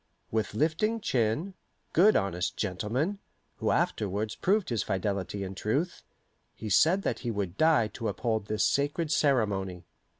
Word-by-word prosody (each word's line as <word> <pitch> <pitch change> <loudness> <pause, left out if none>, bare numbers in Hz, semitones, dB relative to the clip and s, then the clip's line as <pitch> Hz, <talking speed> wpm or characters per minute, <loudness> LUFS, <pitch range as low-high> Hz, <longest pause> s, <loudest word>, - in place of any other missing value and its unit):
With 110 -2 -1
lifting 165 +9 +1
chin 130 - 0 0.4
good 205 +6 +6
honest 90 -2 0
gentleman, 115 - -1 0.4
who - - -1
afterwards 105 +2 0
proved 200 0 +1
his 115 -5 0
fidelity 100 +1 -2
and 95 0 -6
truth 140 - -1 0.5
he 110 -2 -6
said 175 - +4
that - - -1
he 120 - -4
would 100 -5 -2
die 155 -5 +4
to 115 - -5
uphold 110 0 -1
this 110 0 +1
sacred 145 +3 0
ceremony. 100 - +1
110 Hz, 140 wpm, -29 LUFS, 100-160 Hz, 0.5 s, good